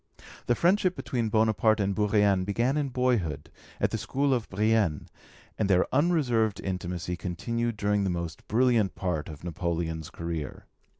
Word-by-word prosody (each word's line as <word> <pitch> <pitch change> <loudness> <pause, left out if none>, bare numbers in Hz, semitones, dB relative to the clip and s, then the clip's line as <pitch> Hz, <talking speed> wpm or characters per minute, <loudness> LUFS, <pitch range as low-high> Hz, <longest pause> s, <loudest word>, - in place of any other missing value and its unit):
The 120 - +3
friendship 185 - +2
between 115 -4 -2
Bonaparte 110 0 +3
and 100 -1 +1
Bourrienne 105 -2 +2
began 115 +8 0
in 145 -2 0
boyhood, 100 - -1 0.3
at - - +1
the - - -2
school 140 0 0
of 120 -3 -2
Brienne, 105 -6 +1 0.5
and 105 -2 +1
their 90 -1 +4
unreserved 130 - +2
intimacy 90 -2 -3
continued 115 +7 -3
during 105 -1 +1
the 95 - 0
most 85 -2 -4
brilliant 115 -3 +2
part 90 -4 -2
of 75 0 -10
Napoleon's 85 -3 -3
career. 85 -4 -5
105 Hz, 145 wpm, -28 LUFS, 90-120 Hz, 0.5 s, their